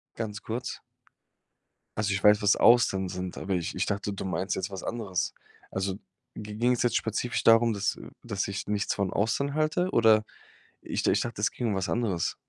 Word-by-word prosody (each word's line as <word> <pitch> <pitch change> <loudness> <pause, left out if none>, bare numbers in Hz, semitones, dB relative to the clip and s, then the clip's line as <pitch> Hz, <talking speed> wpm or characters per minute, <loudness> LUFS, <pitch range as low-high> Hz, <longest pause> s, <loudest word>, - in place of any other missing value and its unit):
Ganz 105 -2 -5
kurz. 120 +3 -4 1.2
Also, 105 -2 0
ich 95 - -1
weiß, 105 0 +6
was 105 - +4
Austern 95 -6 +4
sind, 90 0 -5
aber 95 -1 -2
ich 85 -2 -2
ich 95 - -1
dachte, 100 0 -2
du 100 - -5
meinst 95 +1 -1
jetzt 95 +2 -3
was 95 - -6
anderes. 105 -6 -2 0.4
Also 95 0 -2 0.4
gi 105 0 -7
ging's 120 +1 +2
jetzt 120 - +2
spezifisch 115 +2 -1
darum, 115 0 +5
dass 100 -1 -1 0.2
dass 100 -5 -2
ich 95 -1 -4
nichts 105 -1 0
von 100 -2 -1
Austern 140 +7 0
halte? 155 +4 +1
Oder 110 - +5 0.6
ich - - -3
d - - +3
ich - - +2
dachte, 115 -3 -4
es - - +2
ginge 120 -4 -2
um - - -1
was 95 0 -2
anderes? 105 -8 -1
105 Hz, 190 wpm, -28 LUFS, 95-115 Hz, 1.2 s, weiß